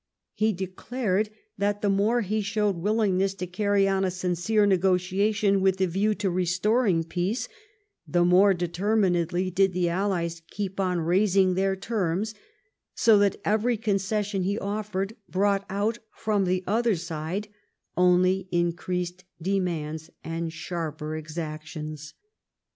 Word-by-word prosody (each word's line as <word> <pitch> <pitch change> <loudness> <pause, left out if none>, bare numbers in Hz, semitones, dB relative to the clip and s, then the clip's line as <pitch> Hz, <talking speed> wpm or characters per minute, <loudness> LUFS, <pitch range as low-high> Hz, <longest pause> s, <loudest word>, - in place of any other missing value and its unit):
He 215 +1 +2
declared 200 +2 -2 0.3
that 205 +1 0
the - - +3
more 210 +5 +2
he 215 +1 -1
showed 205 -1 0
willingness 195 0 +1
to 185 - -4
carry 200 +2 +1
on 195 0 +1
a 190 - +2
sincere 180 +4 +1
negotiation 195 +2 +2
with 190 0 +3
the 190 - +2
view 195 +4 0
of - - -5
restoring 185 +2 +2
peace, 180 +8 -2 0.6
the 175 0 +2
more 190 +2 +5
determinedly 180 -1 0
did 190 +1 +2
the 175 -1 +1
allies 170 -2 -1
keep 195 -1 -4
on 180 -3 +1
raising 190 +2 +3
their 190 +1 +1
terms, 195 0 -1 0.6
so 220 -3 +5
that 200 -1 +2
every 220 +3 +2
concession 205 -1 -1
he 200 +3 0
offered 205 0 -3
brought 200 +1 +1
out 210 +4 -1 0.2
from 210 -3 0
the 185 0 0
other 225 +2 +2
side 170 +5 -4 0.5
only 180 +1 +3
increased 175 +1 -1 0.2
demands 165 -4 -2
and 165 0 -3
sharper 155 -2 -4
exactions. 155 -1 -6
190 Hz, 130 wpm, -26 LUFS, 175-205 Hz, 0.6 s, more